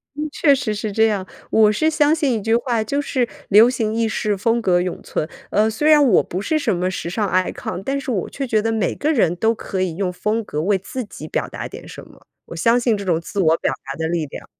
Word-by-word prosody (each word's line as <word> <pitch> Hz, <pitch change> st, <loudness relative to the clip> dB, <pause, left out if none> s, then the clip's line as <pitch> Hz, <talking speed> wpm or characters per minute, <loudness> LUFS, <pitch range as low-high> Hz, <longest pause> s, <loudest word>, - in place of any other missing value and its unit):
嗯， 300 Hz, +1 st, -3 dB
确 290 Hz, -1 st, +4 dB
实 245 Hz, -5 st, -2 dB
是 210 Hz, 0 st, -4 dB
这 220 Hz, +2 st, +3 dB
样， 200 Hz, -4 st, -1 dB, 0.3 s
我 215 Hz, -1 st, +5 dB
是 310 Hz, +10 st, +1 dB
相 305 Hz, -1 st, +3 dB
信 290 Hz, -5 st, +1 dB
一 220 Hz, -, -2 dB
句 225 Hz, +3 st, +2 dB
话， 235 Hz, -2 st, 0 dB
就 280 Hz, +7 st, -1 dB
是： 255 Hz, -4 st, -1 dB, 0.2 s
“流 215 Hz, +4 st, +7 dB
行 225 Hz, -4 st, -1 dB
易 230 Hz, 0 st, +1 dB
逝、 210 Hz, -1 st, -1 dB
风 230 Hz, +4 st, 0 dB
格 180 Hz, -4 st, +2 dB
永 180 Hz, 0 st, -3 dB
存。” 155 Hz, -, -3 dB, 0.2 s
呃， 215 Hz, +1 st, +3 dB
虽 295 Hz, +8 st, +1 dB
然 300 Hz, -1 st, +7 dB
我 240 Hz, -9 st, +4 dB
不 185 Hz, -, -4 dB
是 315 Hz, +9 st, 0 dB
什 245 Hz, -10 st, 0 dB
么 180 Hz, +1 st, -1 dB
时 175 Hz, -2 st, -4 dB
尚 205 Hz, +3 st, -1 dB
icon， 185 Hz, 0 st, -2 dB
但 275 Hz, +1 st, -1 dB
是 270 Hz, -, -7 dB
我 195 Hz, -6 st, -2 dB
却 275 Hz, -1 st, -4 dB
觉 220 Hz, -3 st, +2 dB
得 225 Hz, +1 st, -1 dB
每 220 Hz, -1 st, -1 dB
个 310 Hz, +2 st, 0 dB
人 180 Hz, -, +2 dB
都 220 Hz, +5 st, +2 dB
可 195 Hz, -4 st, -4 dB
以 180 Hz, -3 st, -1 dB
用 185 Hz, 0 st, -1 dB
风 215 Hz, +5 st, -1 dB
格 150 Hz, -7 st, -4 dB
为 195 Hz, +4 st, +2 dB
自 250 Hz, +7 st, -6 dB
己 155 Hz, -6 st, -10 dB
表 -, -, -2 dB
达 -, -, -6 dB
点 -, -, -11 dB
什 -, -, -11 dB
么， -, -, -20 dB, 0.2 s
我 -, -, -9 dB
相 230 Hz, +9 st, +3 dB
信 235 Hz, -3 st, +1 dB
这 200 Hz, -, -6 dB
种 170 Hz, -3 st, +1 dB
自 200 Hz, +4 st, -5 dB
我 165 Hz, -3 st, +4 dB
表 -, -, -1 dB
达 135 Hz, -, -5 dB
的 160 Hz, 0 st, -1 dB
力 165 Hz, -1 st, -1 dB
量。 140 Hz, -, -10 dB
215 Hz, 295 characters per minute, -20 LUFS, 185-245 Hz, 0.3 s, 流